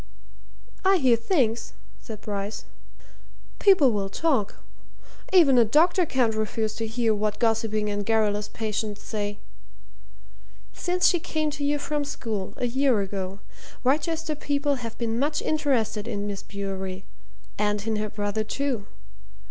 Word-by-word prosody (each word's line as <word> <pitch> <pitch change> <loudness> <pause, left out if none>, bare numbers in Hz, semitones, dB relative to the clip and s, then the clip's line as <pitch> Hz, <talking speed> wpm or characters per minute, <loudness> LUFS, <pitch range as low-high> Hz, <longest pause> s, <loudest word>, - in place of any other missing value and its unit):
"I 385 0 +5
hear 260 -7 +4
things," 230 - 0 0.3
said 220 -3 -8
Bryce. 205 0 -4 0.9
"People 370 -11 +6
will 200 -2 -1
talk 260 -5 0 0.8
even 305 -9 +6
a - - +7
doctor 325 - +3
can't 245 -5 +2
refuse 220 0 -1
to 225 - -2
hear 225 0 +1
what 210 0 -1
gossiping 225 -2 +1
and 205 0 -1
garrulous 210 -1 +1
patients 215 -1 -3
say. 205 -2 -3 1.4
Since 360 0 +2
she 350 - +3
came 310 -1 -1
to 285 - -5
you 290 +1 +2
from 295 0 -2
school, 220 -8 -4
a - - -1
year 255 -1 +2
ago, 195 0 -4 0.4
Wrychester 315 +4 +1
people 285 -1 0
have 230 -1 -6
been 230 -1 -1
much 295 +2 +1
interested 250 -8 0
in 205 -3 -3
Miss 200 -1 -4
Bewery, 190 -1 -5 0.5
and 210 0 0
in 220 -1 0
her 215 0 -2
brother, 205 0 -2
too. 235 -2 -2
225 Hz, 140 wpm, -26 LUFS, 210-285 Hz, 1.4 s, a